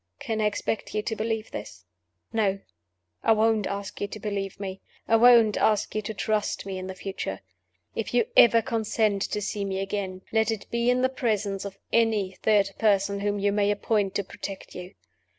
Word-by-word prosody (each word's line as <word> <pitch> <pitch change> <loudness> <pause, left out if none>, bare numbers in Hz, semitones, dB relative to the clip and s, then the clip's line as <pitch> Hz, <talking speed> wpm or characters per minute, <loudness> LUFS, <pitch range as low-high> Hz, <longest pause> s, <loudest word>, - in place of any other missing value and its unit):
Can 225 -6 -2
I - - +2
expect 210 +1 -3
you 210 - 0
to 220 - -2
believe 220 0 -2
this? 95 -2 -8 0.5
No. 205 -3 +2 0.6
I 225 - +4
won't 220 -1 +2
ask 200 0 -5
you 205 - 0
to 215 - -8
believe 200 -2 -4
me; 195 -1 -5 0.3
I 225 - +4
won't 230 -2 +6
ask 215 -2 +2
you 215 - -1
to 215 +1 -5
trust 215 0 -1
me 190 -1 -4
in 185 - -6
the 190 - -6
future. 185 - -5 0.5
If 225 - -3
you 240 -2 +3
ever 230 -1 +7
consent 220 -4 0
to 210 - -1
see 205 +1 -2
me 190 -1 -2
again, 195 -1 -3
let 220 0 +2
it 220 -3 -2
be 235 +1 +1
in 250 +1 +2
the 260 - +4
presence 210 -6 -1
of 195 -1 -7 0.2
any 220 -4 +2
third 205 -2 +3
person 200 -2 +2
whom 205 0 -1
you 200 0 +1
may 205 0 +2
appoint 205 -1 0
to 200 - 0
protect 195 +1 -8
you. 180 +2 -9
210 Hz, 195 wpm, -26 LUFS, 195-220 Hz, 0.6 s, ever